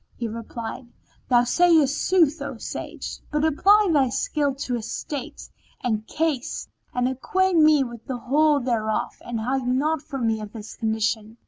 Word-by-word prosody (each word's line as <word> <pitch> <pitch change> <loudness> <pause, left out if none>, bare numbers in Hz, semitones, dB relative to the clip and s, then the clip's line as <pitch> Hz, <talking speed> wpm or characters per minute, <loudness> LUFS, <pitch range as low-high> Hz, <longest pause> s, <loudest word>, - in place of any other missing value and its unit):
"[FN#12] - - -42
He 235 - -2
replied, 230 +2 -6 0.4
Thou 240 -2 +5
sayest 315 +1 +4
sooth, 330 -5 +2
O 280 -4 -5
sage, - - -6
but 300 +1 0
apply 400 +7 +5
thy 270 -4 +3
skill 285 +1 0
to 265 -2 -4
his 230 -2 -3
state 285 -4 -6 0.4
and 220 -3 -1
case, 305 -5 -2 0.2
and 250 0 0
acquaint 350 +7 +1
me 305 -2 +6
with 235 -3 -9
the 255 - -3
whole 290 +4 +3
thereof 230 -4 -1
and 235 -2 -4
hide 255 +3 -1
naught 290 +5 +1
from 275 -6 -4
me 220 -1 0
of 210 0 -8
his 215 -2 -8
condition." 220 0 -1
260 Hz, 165 wpm, -24 LUFS, 230-305 Hz, 0.4 s, me